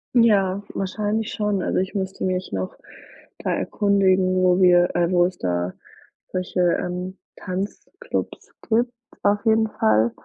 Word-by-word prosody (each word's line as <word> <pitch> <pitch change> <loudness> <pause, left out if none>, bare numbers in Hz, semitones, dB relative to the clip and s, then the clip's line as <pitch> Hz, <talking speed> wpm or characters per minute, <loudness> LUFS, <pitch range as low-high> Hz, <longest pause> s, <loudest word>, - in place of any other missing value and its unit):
Ja, 200 -4 +3
wahrscheinlich 210 +3 -2
schon. 210 -3 -1
Also, - - 0
ich 190 +2 -2
müsste 190 -1 -3
mich 185 0 -1
noch 95 -1 -3 0.6
da - - -2
erkundigen, 190 -2 +2
wo 185 0 +3
wir, 175 -1 +5
äh 175 +1 +2
wo 175 -1 +4
es 180 0 -3
da 90 0 -2 0.6
solche, 185 0 -3 0.2
ähm, 180 +1 -4 0.2
Tanzclubs 200 - -5 0.2
gibt 240 +2 +2 0.3
auf 205 +2 +2
jeden 220 0 +4
Fall. 110 - +2
185 Hz, 135 wpm, -23 LUFS, 180-205 Hz, 0.6 s, wir